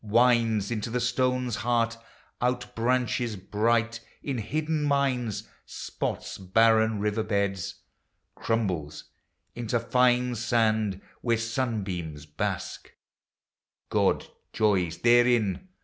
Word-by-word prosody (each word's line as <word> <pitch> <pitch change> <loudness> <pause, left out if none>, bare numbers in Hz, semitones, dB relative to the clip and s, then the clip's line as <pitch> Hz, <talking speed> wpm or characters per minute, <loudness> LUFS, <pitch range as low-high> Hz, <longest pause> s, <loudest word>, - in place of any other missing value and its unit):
Winds 115 -1 +3
into 115 0 -2
the 125 +2 -1
stone's 125 -1 0
heart, 115 -1 +1 0.5
outbranches 125 -1 0
bright 115 +4 0 0.2
In 135 -4 -2
hidden 155 +7 -1
mines, 135 -6 0 0.2
spots - - -5
barren 110 +3 +3
river 105 +2 0
beds, 100 -3 -1 0.6
Crumbles 90 -10 -2 0.5
into 120 0 -1
fine 125 +1 +2
sand 110 -4 +1 0.2
where 115 -2 +2
sunbeams 105 - -3
bask 75 -1 -4 0.5
— - - -62
God - - +2 0.3
joys 95 -6 +1
therein. 120 - +3
115 Hz, 95 wpm, -27 LUFS, 105-125 Hz, 0.6 s, Winds